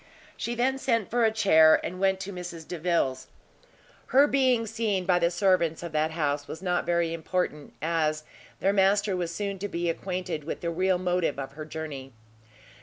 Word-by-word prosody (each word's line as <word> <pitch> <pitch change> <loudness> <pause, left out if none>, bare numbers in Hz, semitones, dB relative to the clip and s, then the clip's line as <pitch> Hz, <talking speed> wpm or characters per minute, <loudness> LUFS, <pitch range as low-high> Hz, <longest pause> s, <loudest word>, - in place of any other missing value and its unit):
She 235 - -3
then 260 +3 +1
sent 230 -6 0
for 240 0 +3
a 220 - +3
chair, 160 -8 +5
and 185 +1 -5
went 190 0 +2
to 200 +1 -6
Mrs 175 -3 -7
Delvile's. 165 -7 -1 0.8
Her 275 +2 +6
being 260 -5 +2
seen 215 -4 -1
by 180 -1 +3
the 170 0 +3
servants 175 -3 +1
of 170 - -5
that 155 0 +1
house 145 -3 -2
was 160 - -7
not 180 -2 -1
very 170 -1 +1
important, 165 -3 -3
as 155 -2 0 0.4
their 195 - +2
master 200 0 +3
was 175 -2 -2
soon 200 +1 -4
to 205 - -3
be 170 -3 -1
acquainted 180 -3 -4
with 160 - -5
the 170 - -2
real 185 +2 +1
motive 180 -4 0
of 135 -1 -5
her 155 +2 -8
journey. 145 -4 -7
180 Hz, 180 wpm, -27 LUFS, 160-200 Hz, 0.8 s, Her